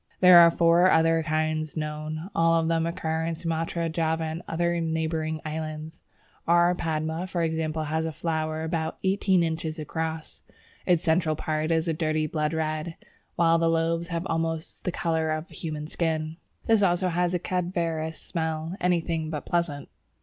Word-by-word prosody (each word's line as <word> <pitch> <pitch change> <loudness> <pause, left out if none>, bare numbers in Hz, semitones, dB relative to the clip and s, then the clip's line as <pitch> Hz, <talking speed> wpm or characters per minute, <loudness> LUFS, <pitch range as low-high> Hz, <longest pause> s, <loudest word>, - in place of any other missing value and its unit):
There 180 -1 +9
are 170 0 +9
four 170 +2 +4
other 165 0 +4
kinds 155 0 -1
known: 155 +3 -4
all 165 0 +3
of 160 - 0
them 165 0 +1
occur 160 -1 -2
in 165 0 -2
Sumatra, 165 0 -2
Java, 160 0 0
and 160 +1 -4
other 170 +1 0
neighbouring 160 -1 -1
islands. 155 +1 -5 0.5
R. 175 +1 +5
Padma 160 +1 -2
for 175 -2 -1
example, 160 -1 -1
has 160 +1 -1
a - - -3
flower 160 0 -2
about 160 -1 -2
eighteen 190 -2 +2
inches 160 -1 -2
across. 160 +1 -4 0.5
The 180 -2 +5
central 160 -1 +1
part 155 +1 -2
is 165 0 +1
a 165 - +1
dirty 155 -1 0
blood 150 0 -1
red, 155 +1 -2 0.4
while 165 0 +4
the 165 0 +2
lobes 165 +1 0
have 170 +1 -3
almost 165 -1 -3
the 180 - 0
colour 160 -2 0
of 155 +3 -3
the - - -15
human 155 -3 -5
skin. 160 -1 -2 0.3
This 225 -2 +4
also 180 -1 +2
has 175 +1 0
a - - 0
"cadaverous 170 -3 -2
smell, 160 0 -3
anything 165 -3 0
but 150 -2 -5
pleasant." 170 -5 -1
160 Hz, 165 wpm, -26 LUFS, 155-170 Hz, 0.5 s, There